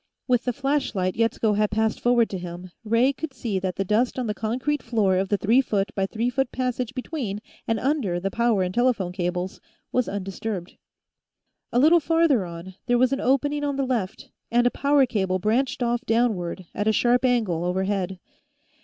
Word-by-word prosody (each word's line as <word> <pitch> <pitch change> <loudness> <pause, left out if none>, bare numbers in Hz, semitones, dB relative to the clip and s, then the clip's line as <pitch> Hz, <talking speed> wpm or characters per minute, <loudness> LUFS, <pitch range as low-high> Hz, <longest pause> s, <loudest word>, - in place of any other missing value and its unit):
With 245 -3 +2
the 250 - +1
flashlight 250 -8 -1
Yetsko 225 -1 +1
had 210 0 +2
passed 220 +1 0
forward 240 -1 +3
to 190 - -3
him, 175 +1 -8
Ray 230 +5 +3
could 280 0 -6
see 215 -6 -2
that 185 -1 -3
the 195 - -1
dust 225 +7 +1
on 255 - -1
the 210 - -1
concrete 255 +7 -2
floor 215 -5 +1
of 190 0 0
the 205 - +2
three 230 +6 +4
foot 200 -5 -1
by 195 -1 0
three 230 +4 -1
foot 270 0 0
passage 255 -1 -2
between 255 -7 -4 0.3
and 225 -1 +1
under 250 - 0
the 195 +2 -2
power 235 -4 +2
and 180 0 -3
telephone 240 -7 +1
cables 180 0 -3 0.3
was 250 -1 +1
undisturbed. 195 -1 -5 1.0
A - - 0
little 315 +7 +6
farther 320 - +2
on, 170 +2 -9
there 245 -1 +3
was 255 +2 +3
an 270 - -1
opening 290 +3 +1
on 285 -1 -1
the 275 0 0
left, 230 -8 -3 0.2
and 240 +1 +3
a 245 - +4
power 280 0 +3
cable 190 -6 0
branched 240 +7 0
off 240 +1 0
downward, 210 -6 0
at 205 - -2
a - - +5
sharp 240 +3 +2
angle, 220 -10 +1
overhead. 190 +1 -1
225 Hz, 190 wpm, -24 LUFS, 195-255 Hz, 1.0 s, little